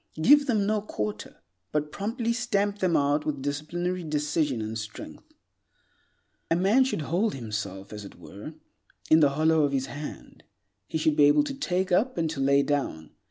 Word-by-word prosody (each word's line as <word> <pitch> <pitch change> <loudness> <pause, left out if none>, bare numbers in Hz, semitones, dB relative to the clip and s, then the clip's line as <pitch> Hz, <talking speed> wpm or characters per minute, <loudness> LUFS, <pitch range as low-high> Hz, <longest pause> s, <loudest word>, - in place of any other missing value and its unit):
Give 285 - +6
them 215 -6 +2
no 215 0 +1
quarter, 105 - -5 0.3
but 150 0 -1
promptly 230 +3 -2
stamp 205 -4 -1
them 180 -4 +2
out 145 +1 +1
with 140 -3 -3
disciplinary 175 +5 -3
decision 150 -3 -1
and 110 0 -4
strength. 110 -1 -8 1.3
A 165 - +3
man 200 +9 +4
should 255 -12 -2
hold 185 +7 0
himself, 105 -5 -5
as 105 -1 -7
it 100 - -11
were, 105 +11 -10 0.6
in 160 - +8
the 145 -3 +5
hollow 160 0 +3
of 140 -1 0
his 135 -1 0
hand. 145 +3 -9 0.4
He - - -2
should 155 -1 +2
be 145 - +6
able 145 - +5
to 285 -1 -4
take 190 -9 -1
up 240 +7 +2
and 165 -1 +1
to 155 - -6
lay 140 +1 +3
down. 135 - -2
155 Hz, 175 wpm, -27 LUFS, 140-200 Hz, 1.3 s, in